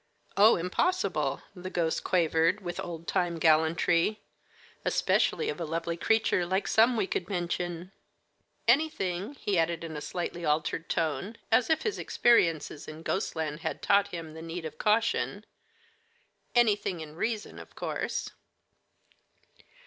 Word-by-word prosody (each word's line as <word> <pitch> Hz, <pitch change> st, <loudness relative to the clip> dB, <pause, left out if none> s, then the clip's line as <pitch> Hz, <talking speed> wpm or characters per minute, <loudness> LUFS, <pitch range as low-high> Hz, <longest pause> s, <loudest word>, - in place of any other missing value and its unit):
"Oh, 215 Hz, +3 st, +7 dB
impossible," 355 Hz, -, 0 dB
the 185 Hz, 0 st, -6 dB
ghost 165 Hz, -3 st, -1 dB
quavered, 170 Hz, +2 st, +2 dB
with 175 Hz, -2 st, -5 dB
old 170 Hz, -1 st, -6 dB
time 175 Hz, -2 st, 0 dB
gallantry; 165 Hz, +5 st, +3 dB, 0.6 s
"especially 455 Hz, -, +1 dB
of 445 Hz, -, -3 dB
a -, -, 0 dB
lovely 165 Hz, +1 st, -2 dB
creature 220 Hz, 0 st, +2 dB
like 190 Hz, +3 st, -1 dB
some 230 Hz, +2 st, +4 dB
we 210 Hz, -, +2 dB
could 185 Hz, -1 st, -3 dB
mention. 175 Hz, -1 st, -3 dB, 0.8 s
Anything," 235 Hz, -, +1 dB
he 200 Hz, -8 st, 0 dB
added 165 Hz, 0 st, 0 dB
in 160 Hz, -2 st, -6 dB
a 150 Hz, -, -5 dB
slightly 175 Hz, +1 st, -4 dB
altered 155 Hz, +1 st, 0 dB
tone, 170 Hz, +7 st, -1 dB
as 250 Hz, -, +4 dB
if 320 Hz, 0 st, +2 dB
his 435 Hz, -, -2 dB
experiences 165 Hz, -10 st, +2 dB
in 155 Hz, +1 st, -9 dB
ghostland 160 Hz, -6 st, -2 dB
had 160 Hz, -1 st, -4 dB
taught 200 Hz, 0 st, +4 dB
him 165 Hz, -3 st, -7 dB
the 160 Hz, -, -9 dB
need 165 Hz, +1 st, -6 dB
of 160 Hz, -, -7 dB
caution 225 Hz, +2 st, +1 dB, 1.1 s
"anything 210 Hz, -6 st, +2 dB
in 155 Hz, -1 st, -9 dB
reason, 220 Hz, +4 st, -3 dB
of -, -, -13 dB
course." -, -, -3 dB
175 Hz, 135 wpm, -29 LUFS, 165-210 Hz, 1.1 s, Oh